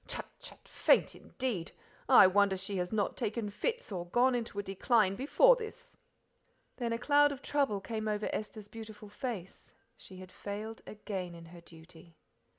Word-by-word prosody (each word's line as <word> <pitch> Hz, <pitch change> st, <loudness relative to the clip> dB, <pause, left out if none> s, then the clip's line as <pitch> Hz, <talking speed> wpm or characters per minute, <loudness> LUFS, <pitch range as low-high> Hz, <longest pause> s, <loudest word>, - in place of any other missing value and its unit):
Chut, -, -, -4 dB
chut! -, -, -12 dB
faint -, -, +3 dB
indeed 235 Hz, -11 st, -4 dB, 0.4 s
I -, -, +9 dB
wonder 195 Hz, +1 st, +3 dB
she 195 Hz, +1 st, -3 dB
has 180 Hz, 0 st, -2 dB
not 210 Hz, -2 st, 0 dB
taken 220 Hz, -2 st, -3 dB
fits 480 Hz, -, -3 dB
or 175 Hz, -3 st, -4 dB
gone 250 Hz, +7 st, +3 dB
into 235 Hz, -4 st, -3 dB
a 205 Hz, -, -1 dB
decline 195 Hz, +1 st, +2 dB
before 400 Hz, -, +5 dB
this." 445 Hz, -3 st, -9 dB, 0.8 s
Then 235 Hz, -2 st, -2 dB
a 230 Hz, -, 0 dB
cloud 290 Hz, +3 st, +4 dB
of 275 Hz, -1 st, -8 dB
trouble 275 Hz, -9 st, 0 dB
came 220 Hz, +2 st, -4 dB
over 210 Hz, 0 st, -1 dB
Esther's 215 Hz, -1 st, -5 dB
beautiful 215 Hz, -1 st, -10 dB
face 205 Hz, -4 st, -7 dB, 0.2 s
she 190 Hz, -, -13 dB
had 185 Hz, 0 st, -11 dB
failed 215 Hz, +2 st, -6 dB
again 190 Hz, -4 st, -6 dB
in 165 Hz, 0 st, -11 dB
her 170 Hz, +1 st, -13 dB
duty. 165 Hz, 0 st, -16 dB
210 Hz, 165 wpm, -32 LUFS, 190-240 Hz, 0.8 s, I